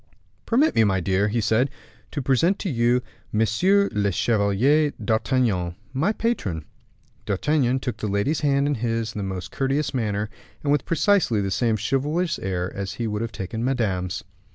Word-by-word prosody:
"Permit 270 +7 +3
me, 115 - +4
my 95 -3 +2
dear," 95 +3 +1
he 110 +3 0
said, 115 +5 +2 0.4
"to 145 - -4
present 150 +9 +3
to 185 - -3
you 120 0 +2 0.3
Monsieur 180 - +3
le 100 -1 +1
Chevalier 120 - +2
d'Artagnan, 110 -6 0 0.2
my 155 +10 +1
patron." 110 - -2 0.6
D'Artagnan 130 +5 +1
took 125 -1 -4
the 110 - -3
lady's 100 +10 0
hand 140 -1 +2
in 145 - +1
his 115 -2 -2
in - - -5
the - - -2
most 95 -1 -5
courteous 135 +2 0
manner, 105 -4 -1 0.4
and 145 - +1
with 145 -2 +2
precisely 170 - +3
the 100 -1 -1
same 110 +3 +1
chivalrous 150 - 0
air 90 -1 -2
as 95 -1 -4
he 120 - -3
would 105 -1 -2
have 115 -1 -3
taken 110 +4 -4
Madame's. 100 -9 -1
115 Hz, 170 wpm, -24 LUFS, 100-140 Hz, 0.6 s, me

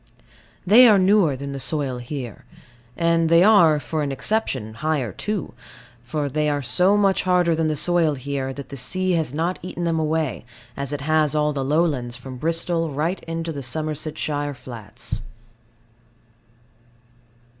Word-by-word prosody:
They 230 +7 +8
are 215 -3 +6
newer 190 -6 +3
than 140 +2 -6
the 140 - -5
soil 135 -2 -2
here; 125 -3 -7 0.5
and 165 -1 +2
they 170 +1 +6
are 175 -8 +6
(for 155 +1 -3
an 145 -2 -2
exception) 135 - -1
higher 140 -2 -1
too; 200 - -4 0.5
for 145 +4 -2
they 150 +2 0
are 145 -1 -1
so 180 +11 +3
much 195 -2 +2
harder 180 -2 +2
than 160 0 0
the 155 - 0
soil 165 0 +1
here, 135 0 -4
that 140 +1 -8
the 140 - -8
sea 185 +9 0
has 160 -6 0
not 165 +5 -2
eaten 175 -1 -5
them 165 -1 0
away, 155 -3 -1 0.3
as 140 0 -4
it 145 -1 -4
has 155 0 +1
all 150 0 +1
the 135 -1 -2
lowlands 140 -5 0
from 130 0 -9
Bristol 165 +3 0
right 155 +6 -2
into 165 0 -4
the 145 -3 -5
Somersetshire 150 +1 -3
flats. 120 -1 -6
155 Hz, 155 wpm, -22 LUFS, 135-170 Hz, 0.5 s, They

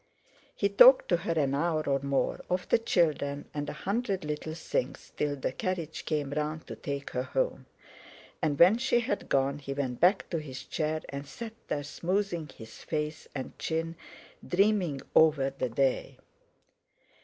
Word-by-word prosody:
He 200 - +2
talked 245 +6 +7
to 175 - +4
her 170 0 -2
an 140 -4 +1
hour 155 +2 +1
or 140 -1 +2
more, 140 0 -1
of 180 0 -1
the - - +4
children, 150 -9 +1
and 145 0 -3
a - - -4
hundred 200 -3 -1
little 150 +1 -4
things, 150 -5 -3
till 145 -1 0
the 135 - -2
carriage 170 +1 -3
came 150 -3 -1
round 150 +2 -2
to - - -7
take 140 0 -5
her 125 - -1
home. - - -2 0.7
And 150 -4 +1
when 185 +9 +7
she 240 -2 +2
had 205 -3 -3
gone 140 +1 +1
he 140 -1 -5
went 130 -3 -2
back 180 +4 +4
to 165 - 0
his 135 -4 -7
chair, 155 0 -2
and 140 0 -6
sat 220 +10 -7
there 145 - -2
smoothing 175 +2 -2
his 110 -3 -12
face 150 -1 -3
and 130 - -5
chin, 165 +1 -2 0.5
dreaming 185 -7 +2
over 145 -4 +5
the 130 -2 -3
day. 130 +3 0
155 Hz, 165 wpm, -29 LUFS, 140-180 Hz, 0.7 s, talked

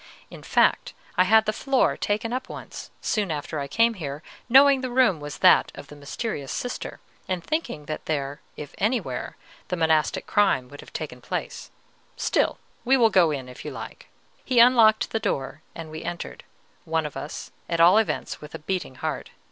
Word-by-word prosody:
In - - -10
fact, - - +2 0.2
I 185 - +4
had 220 +3 +5
the 215 - 0
floor 270 +3 +1
taken 215 +3 -2
up 255 +1 -4
once, - - -8
soon 210 -4 0
after 155 0 -3
I 140 - -3
came 230 +10 +3
here, 150 -6 -6 0.3
knowing 270 +1 +7
the 255 - -3
room 245 -9 +3
was 145 0 -7
that - - +5
of - - -10
the 150 - -11
mysterious 145 - -5
Sister, 245 - -4 0.3
and 185 -2 -2
thinking 280 - -3
that 155 - -6
there, 145 -2 -2 0.2
if 150 -2 -8
anywhere, 225 +4 -1 0.3
the 180 - -2
monastic 160 -2 +1
crime 165 -12 +2
would 145 - -11
have - - -15
taken - - -6
place; - - -5 0.5
still, - - +1 0.3
we 265 +2 +4
will 230 -3 +4
go 180 -4 +5
in, 135 -4 -3
if 125 - -11
you - - -5
like." - - -9 0.4
He 255 - -1
unlocked 235 -2 +6
the 225 - 0
door, 140 -6 -3
and 165 -2 -8
we 155 - -7
entered, 175 - -6 0.4
one 160 -1 -1
of 150 - -6
us, 145 - -7 0.2
at 170 -1 -1
all 175 +6 +7
events, 220 - -2
with 150 0 -9
a - - -6
beating 180 -5 -3
heart. - - -4
180 Hz, 190 wpm, -25 LUFS, 150-230 Hz, 0.5 s, knowing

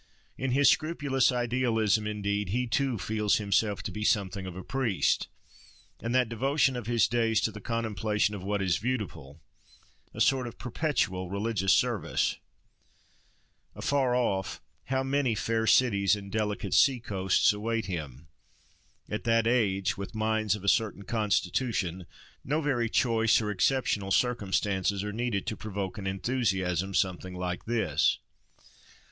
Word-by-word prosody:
In 130 - -2
his 140 +1 +4
scrupulous 145 -5 +2
idealism, 115 -4 +1
indeed, 105 -1 -2
he 125 +5 0
too 130 0 0
feels 105 +1 0
himself 105 0 0
to - - -4
be 105 - -5
something 100 -2 0
of 90 - -7
a 95 - -7
priest, 130 -8 0 0.7
and 115 +2 -2
that 130 -2 +3
devotion 135 +4 +1
of 120 -3 -5
his 120 -1 +3
days 115 -1 +1
to 110 - 0
the 105 0 -10
contemplation 110 -2 -1
of 100 - -6
what 100 +1 -1
is 90 -3 +1
beautiful, 90 - -4 0.7
a - - -10
sort 130 -2 +2
of 115 - -9
perpetual 120 - -1
religious 100 -1 0
service. - - +1 1.4
Afar 135 -3 +1
off, 95 -8 -1 0.3
how 130 0 0
many 135 -3 +1
fair 115 +1 -1
cities 105 -4 +4
and 100 -1 -9
delicate 105 -2 -2
sea 135 -3 +5
coasts 100 -1 +2
await 115 +1 -2
him! 75 -5 -6 0.8
At 105 - -4
that 115 -1 +3
age, 100 -7 +1
with 100 +3 -7
minds 110 -1 +1
of 105 - -9
a - - -5
certain 105 -1 +1
constitution, 100 -3 -1 0.4
no 150 +4 0
very 130 -7 0
choice 115 -2 +3
or 105 -2 -2
exceptional 105 -1 +1
circumstances 100 -3 0
are 105 0 -4
needed 115 -4 -2
to 110 - -3
provoke 100 -2 -5
an 95 - -5
enthusiasm 95 -3 -1
something 95 0 -1
like 90 -1 -4
this. 110 -4 +1
110 Hz, 145 wpm, -28 LUFS, 95-120 Hz, 1.4 s, sea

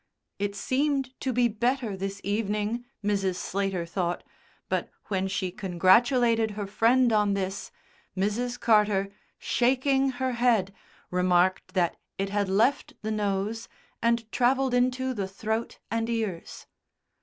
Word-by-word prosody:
It 200 0 -2
seemed 270 +3 0
to 265 - -1
be 245 0 +3
better 235 0 -1
this 195 +1 -5
evening, 210 +3 -1 0.2
Mrs. 195 -3 +1
Slater 195 -2 -2
thought, 175 0 -2 0.4
but - - -1 0.2
when 190 -1 0
she 190 -1 -2
congratulated 220 +5 +3
her 205 - -2
friend 230 +4 +3
on 210 -2 +3
this, 195 0 -3 0.5
Mrs. 240 +6 -1
Carter, 210 -3 +3 0.3
shaking 265 +2 +2
her 260 0 0
head, 235 -6 +2 0.4
remarked 180 +1 +2
that 175 -2 +1 0.2
it 195 0 -1
had 200 -1 0
left 225 +8 +2
the 220 - -2
nose 210 +1 -2 0.3
and 230 -1 +1
travelled 260 +1 +2
into 255 +1 +1
the 200 -5 -3
throat 220 +4 -3
and 230 0 -1
ears. 220 -7 -3
215 Hz, 130 wpm, -27 LUFS, 195-245 Hz, 0.5 s, be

